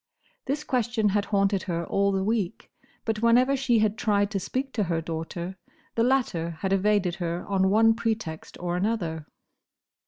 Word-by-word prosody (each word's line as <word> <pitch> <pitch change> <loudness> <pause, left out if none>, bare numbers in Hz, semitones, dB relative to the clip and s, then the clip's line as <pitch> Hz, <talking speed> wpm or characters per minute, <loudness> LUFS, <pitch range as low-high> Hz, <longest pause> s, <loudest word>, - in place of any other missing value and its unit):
This 290 +3 -2
question 235 -5 +1
had 200 +1 +1
haunted 200 -1 +1
her 170 0 -1
all 200 +3 +1
the 190 -1 0
week; 215 -1 -2 0.3
but 220 -1 -1
whenever 245 +4 +4
she 260 -3 +2
had 215 0 +1
tried 205 -1 +2
to 200 - -1
speak 260 +7 -3
to 210 -4 0
her 165 -1 0
daughter, 165 +3 -5 0.4
the 230 - 0
latter 200 -11 0
had 190 0 0
evaded 195 -2 +2
her 170 -1 -3
on 190 -1 +2
one 225 +2 +5
pretext 220 -8 -3
or 175 0 -2
another. 180 -6 -2
200 Hz, 165 wpm, -26 LUFS, 180-225 Hz, 0.4 s, one